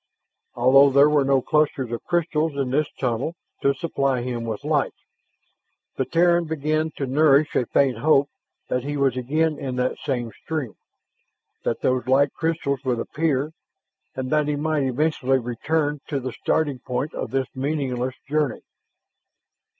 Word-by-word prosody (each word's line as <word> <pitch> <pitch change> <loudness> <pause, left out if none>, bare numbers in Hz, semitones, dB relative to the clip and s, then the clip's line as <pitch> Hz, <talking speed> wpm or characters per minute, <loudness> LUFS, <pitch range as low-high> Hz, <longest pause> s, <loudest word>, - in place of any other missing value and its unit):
Although 135 +3 +6
there 140 +2 +5
were 145 -2 +4
no 135 -1 +2
clusters 145 -5 +1
of 120 - -4
crystals 165 -3 0
in 135 -3 -1
this 150 +2 +2
tunnel 125 +6 -1 0.3
to 140 0 +2
supply 135 -4 -1
him 120 -2 -3
with 110 +2 -4
light, 150 -2 0 1.0
the 130 - -1
Terran 170 +2 +3
began 155 0 -1
to 140 - -1
nourish 145 +2 +3
a 120 - +1
faint 130 -5 +2
hope 140 +1 +4 0.4
that 125 -1 -1
he 145 +1 -3
was 135 -3 +2
again 150 +5 0
in 130 -2 -4
that 125 0 -1
same 120 -5 -2
stream, 150 -9 -3 0.9
that - - -1
those 130 -1 0
light 140 +2 +3
crystals 155 -4 -1
would 125 -3 0
appear, 145 +3 -1 0.6
and 130 -1 -4
that 150 -1 +2
he 150 - 0
might 155 0 0
eventually 135 0 +1
return 145 +5 -1
to 140 - -2
the 130 0 -4
starting 145 -5 0
point 125 +5 -3
of - - -4
this 135 0 0
meaningless 130 -2 -2
journey. 150 -3 0
140 Hz, 155 wpm, -23 LUFS, 130-155 Hz, 1.0 s, Although